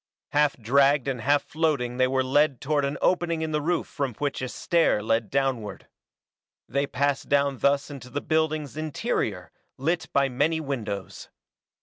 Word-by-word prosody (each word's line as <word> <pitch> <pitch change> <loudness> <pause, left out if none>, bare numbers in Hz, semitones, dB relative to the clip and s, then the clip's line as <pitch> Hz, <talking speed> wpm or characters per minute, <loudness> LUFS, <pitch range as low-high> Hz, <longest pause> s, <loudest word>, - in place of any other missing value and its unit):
Half 145 -1 +2
dragged 140 +4 +3
and 130 -3 -2
half 145 +3 +2
floating 145 -6 -1
they 130 0 +4
were 130 0 +1
led 140 0 +2
toward 145 0 0
an 140 +1 -2
opening 170 -3 +1
in 160 - -3
the 150 0 0
roof 170 +3 0
from 135 -5 -3
which 145 +1 -2
a 130 - -3
stair 165 -11 +1
led 115 -1 0
downward. 130 -6 -1 0.8
They 140 +1 0
passed 140 0 -1
down 140 -2 +2
thus 140 +1 +1
into 130 -3 -9
the 140 +3 -2
building's 155 -2 -1
interior, 155 -2 -2 0.3
lit 165 +6 -1
by 140 0 +3
many 145 +5 0
windows. 110 - -5
140 Hz, 160 wpm, -26 LUFS, 130-155 Hz, 0.8 s, they